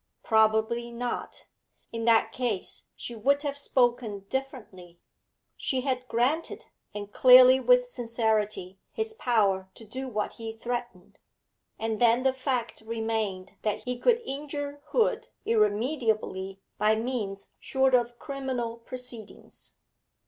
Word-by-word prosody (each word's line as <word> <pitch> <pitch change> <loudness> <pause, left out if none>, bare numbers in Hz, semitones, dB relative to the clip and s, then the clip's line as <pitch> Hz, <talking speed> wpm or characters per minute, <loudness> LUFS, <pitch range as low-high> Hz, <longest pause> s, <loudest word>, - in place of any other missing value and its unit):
Probably 220 +2 +2
not; 240 +1 -4 0.5
in 230 0 -3
that 225 -1 +4
case 230 -7 -3
she 240 - -7
would 280 +6 +1
have 285 -1 -2
spoken 240 -6 +1
differently 210 -10 -6 0.6
she 260 -1 0
had 255 -1 -2
granted, 255 +9 0 0.3
and 205 0 -7
clearly 255 0 +8
with - - +4
sincerity, 220 - -1
his 445 -1 -3
power 200 - +1
to 225 - -12
do 260 +5 -6
what 215 -4 -2
he 225 0 -4
threatened. 240 -5 -6 0.6
And 225 0 -3
then 240 +1 +4
the 265 -1 +3
fact 255 -4 -2
remained 220 -4 -2
that 210 -2 -2
he 250 -1 -3
could 475 - +4
injure 285 +1 -5
Hood 470 -2 +1 0.2
irremediably 215 -3 0 0.2
by 215 +1 +4
means 220 -4 -3
short 265 -1 +1
of 240 -1 +2
criminal 260 -5 -4
proceedings. 240 -2 -7
235 Hz, 120 wpm, -28 LUFS, 220-260 Hz, 0.6 s, clearly